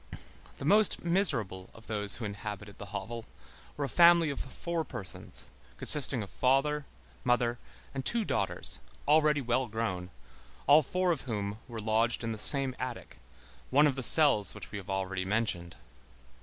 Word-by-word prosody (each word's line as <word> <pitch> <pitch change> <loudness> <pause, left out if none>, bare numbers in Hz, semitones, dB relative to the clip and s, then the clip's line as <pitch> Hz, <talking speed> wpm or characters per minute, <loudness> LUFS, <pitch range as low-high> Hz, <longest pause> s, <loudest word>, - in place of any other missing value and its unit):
The - - -7
most 210 +5 +3
miserable 125 - +1
of 110 - -16
those 105 -2 -2
who 120 - -6
inhabited 105 0 -8
the 100 - -8
hovel 105 +4 -7 0.5
were 145 - -2
a - - -4
family 170 +2 +4
of 140 - -7
four 165 +5 -5
persons, 95 - -7 0.3
consisting 135 - +4
of 100 - -11
father, 140 +3 0 0.4
mother, 120 -1 0 0.3
and 135 -1 -5
two 230 - 0
daughters, 95 - -1 0.3
already 150 -1 +3
well 125 +1 -1
grown, 105 -5 -4 0.6
all 145 +3 +6
four 180 +5 -1
of 165 - -2
whom 105 -1 -4
were 115 -3 -7
lodged 110 +2 0
in 115 - -3
the 110 - -6
same 135 +2 +2
attic, 130 -2 -7 0.5
one 145 +3 +4
of 145 -3 +1
the 135 - -4
cells 125 -5 +7
which - - -10
we 105 - -6
have 100 0 -13
already 95 -1 -3
mentioned. 95 -4 -2
120 Hz, 160 wpm, -29 LUFS, 105-145 Hz, 0.6 s, cells